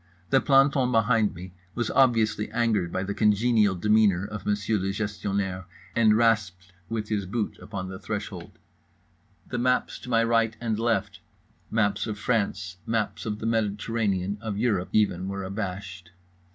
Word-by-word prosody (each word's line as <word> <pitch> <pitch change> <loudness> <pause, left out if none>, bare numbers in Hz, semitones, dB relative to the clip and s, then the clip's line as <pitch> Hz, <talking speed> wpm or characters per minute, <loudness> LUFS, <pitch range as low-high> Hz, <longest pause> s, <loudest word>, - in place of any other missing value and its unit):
The 135 -1 +5
planton 135 -2 +4
behind 115 -2 +2
me 90 +1 -9 0.2
was 120 -2 -1
obviously 115 -5 +3
angered 110 -6 0
by 95 - -2
the 100 +1 -3
congenial 105 -1 +3
demeanour 105 -1 +3
of 105 -2 -7
Monsieur 105 +1 +1
le 95 - -2
Gestionnaire, 100 -2 -2 0.3
and 110 -2 +5
rasped 100 -6 +1 0.2
with 110 -2 -3
his 100 -3 -1
boot 105 +2 -3
upon 95 -3 -6
the 95 0 -7
threshold. 100 -3 -6 0.9
The 125 - -3
maps 125 +1 +1
to - - -10
my 115 -1 +3
right 115 -1 +1
and 110 -2 -2
left, 100 -4 0 0.5
maps 105 -2 +1
of 105 -1 -4
France, 100 -5 -1
maps 110 -1 -1
of 105 -1 -2
the 110 - -6
Mediterranean, 105 -3 -1
of 110 -3 -4
Europe, 105 -5 0
even, 95 -4 +1
were 100 0 -4
abashed. 95 -2 -5
105 Hz, 150 wpm, -26 LUFS, 95-115 Hz, 0.9 s, The